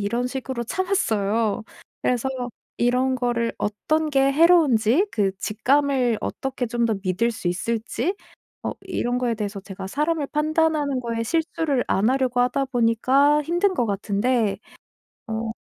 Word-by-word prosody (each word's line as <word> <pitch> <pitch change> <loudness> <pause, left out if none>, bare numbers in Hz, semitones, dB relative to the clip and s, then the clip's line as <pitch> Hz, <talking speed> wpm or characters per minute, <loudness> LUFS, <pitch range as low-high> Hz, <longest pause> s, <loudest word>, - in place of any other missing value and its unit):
이런 235 +5 -1
식으로 260 -1 -4
참았어요. 225 - 0 0.4
그래서 250 +1 +1 0.5
이런 250 +2 +2
거를 240 -2 0
어떤 305 +10 0
게 275 0 +3
해로운지, 310 - +4
그 200 -3 +1
직감을 250 +2 +1
어떻게 265 -2 -3
좀 235 0 -1
더 225 -2 +1
믿을 195 +5 +1
수 185 -5 -3
있을지 230 - -2 0.5
어 - - -2
이런 250 -10 -2
거에 240 -2 0
대해서 205 -2 -4
제가 190 -1 -8
사람을 300 +5 0
판단하는 305 -2 +1
거에 230 -1 -2
실수를 320 -2 0
안 205 +4 +2
하려고 260 -2 0
하다 250 +3 +1
보니까 260 +4 +3
힘든 350 +5 +1
것 245 - +1
같은데 205 +1 0 0.7
어 225 0 -3
245 Hz, 290 characters per minute, -23 LUFS, 225-285 Hz, 0.7 s, 해로운지